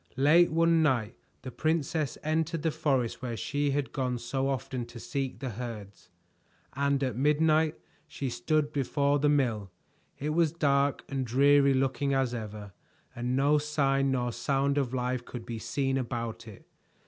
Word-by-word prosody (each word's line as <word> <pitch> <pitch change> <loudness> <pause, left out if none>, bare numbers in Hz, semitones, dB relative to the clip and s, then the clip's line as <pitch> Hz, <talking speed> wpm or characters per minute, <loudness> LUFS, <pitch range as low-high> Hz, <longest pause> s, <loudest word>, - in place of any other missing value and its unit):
Late 155 +6 +5
one 165 0 +3
night 125 -6 +1 0.3
the 130 - -6
princess 155 0 -1
entered 160 +1 -1
the 160 - +1
forest 140 -6 0
where 120 -3 -4
she 145 +4 -1
had 140 0 -1
gone 130 -3 -1
so 135 +3 -2
often 130 -2 -3
to 120 0 -10
seek 135 +1 -3
the 130 -2 -4
herds, 110 -3 -8 0.6
and 140 0 +1
at 130 -4 -1
midnight 155 +3 +3 0.3
she 140 - -5
stood 150 +7 0
before 140 +1 +1
the 145 +1 +3
mill. 120 -9 +1 0.5
It 150 +2 -2
was 165 -1 +2
dark 140 -3 +1
and 135 -2 -2
dreary 140 +3 +4
looking 135 +1 0
as 130 -2 +1
ever, 105 -3 -7 0.4
and 125 +1 -2
no 145 +3 +3
sign 140 -2 +1
nor 125 -2 0
sound 140 +3 0
of 130 -4 -1
life 125 -1 -2
could 120 -2 -8
be 115 -2 -5
seen 135 +3 -1
about 115 -2 -4
it. 105 - -13
135 Hz, 160 wpm, -29 LUFS, 125-145 Hz, 0.6 s, Late